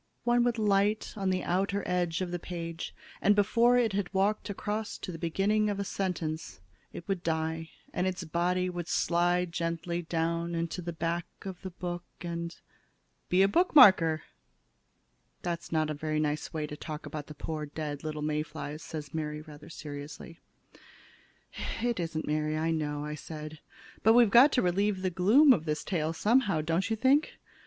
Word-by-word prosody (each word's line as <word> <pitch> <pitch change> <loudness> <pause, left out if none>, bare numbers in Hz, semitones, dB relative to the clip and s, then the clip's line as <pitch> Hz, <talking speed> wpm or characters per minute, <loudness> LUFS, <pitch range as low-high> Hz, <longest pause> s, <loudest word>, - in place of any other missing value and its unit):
One 240 0 +3
would 240 -1 +1
light 205 0 +2
on 195 -2 -1
the 185 -1 0
outer 195 +2 0
edge 175 -1 0
of 180 -1 -2
the 175 - -2
page, 170 -1 -6 0.3
and 205 - +5
before 230 +4 +4
it 230 -4 +2
had 195 -2 -1
walked 200 +2 +1
across 210 +2 -3
to 185 - -6
the 165 - -7
beginning 205 +6 +1
of 200 -1 -2
a - - 0
sentence, 180 -5 -3 0.3
it 170 - -9
would 195 -3 -1
die 160 0 -2 0.2
and 180 - 0
its 185 -1 -3
body 175 +2 0
would 175 -2 -4
slide 175 0 +1
gently 170 0 -2
down 170 0 -1
into 170 +2 -2
the 170 0 -4
back 170 +1 -2 0.2
of 190 -2 -7
the 190 - -5
book 175 -1 -5 0.2
and 170 -1 -5 0.7
be 185 +2 +5
a - - +5
bookmarker!" 200 - +6 1.2
"That's 170 -1 -4
not 155 -1 +1
a - - -1
very 155 +1 -2
nice 150 0 -1
way 155 -1 -2
to 150 - -7
talk 155 0 -7
about 150 -2 -6
the 150 - -9
poor 150 0 -4
little 155 0 -4
dead - - -1
May 150 0 0
flies," 150 0 -6
said 150 -3 -7
Mary, 150 -1 -3
rather 150 -1 -12
seriously. 150 +2 -8 1.4
"It 235 -2 0
isn't, 165 -2 -2
Mary, 155 0 0
I 160 +1 0
know," 150 -1 -2
said 155 0 -8
I. - - -22
"But 220 - +6
we've 240 -4 +6
got 260 +6 +8
to 250 - +3
relieve 190 +2 +1
the 185 - +1
gloom 225 - +6
of 160 -8 -2
this 150 -1 -2
tale 160 -5 -1
someway, 205 -2 +2
don't 165 +6 0
you 225 - +1
think? 265 +7 +3
170 Hz, 180 wpm, -30 LUFS, 155-195 Hz, 1.4 s, got